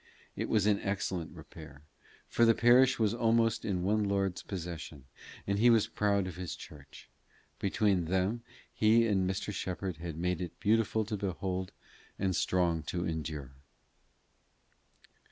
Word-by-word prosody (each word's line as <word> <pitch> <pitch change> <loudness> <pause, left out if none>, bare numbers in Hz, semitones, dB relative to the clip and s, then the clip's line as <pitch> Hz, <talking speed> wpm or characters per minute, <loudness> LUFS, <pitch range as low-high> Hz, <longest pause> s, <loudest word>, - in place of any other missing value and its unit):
It - - -3
was 105 -3 +2
in 105 -1 +3
excellent 95 -3 -3
repair, 75 -3 -12 0.4
for 120 - +1
the 115 -1 +6
parish 125 +2 +5
was 110 -2 +2
almost 115 -1 +2
all 110 - -3
in 90 -2 -1
one 105 +3 +2
lord's 100 -2 0
possession, 85 -7 -7 0.4
and 100 0 0
he 120 +2 +6
was 115 -2 +5
proud 100 -3 0
of 90 -1 -7
his 90 -1 -5
church: 75 -2 -13 0.5
between 100 -2 +1
them 95 +7 0 0.3
he 110 +2 +4
and 95 -4 +1
Mr. 100 +2 -3
Shepherd 90 -2 -4
had 85 -1 -6
made 90 +1 -1
it 90 -2 -6
beautiful 110 0 +2
to 105 +1 -3
behold 95 -1 -3 0.5
and 95 -2 0
strong 85 -2 +1
to 90 0 -2
endure. 80 -5 -4
95 Hz, 150 wpm, -31 LUFS, 85-110 Hz, 0.5 s, the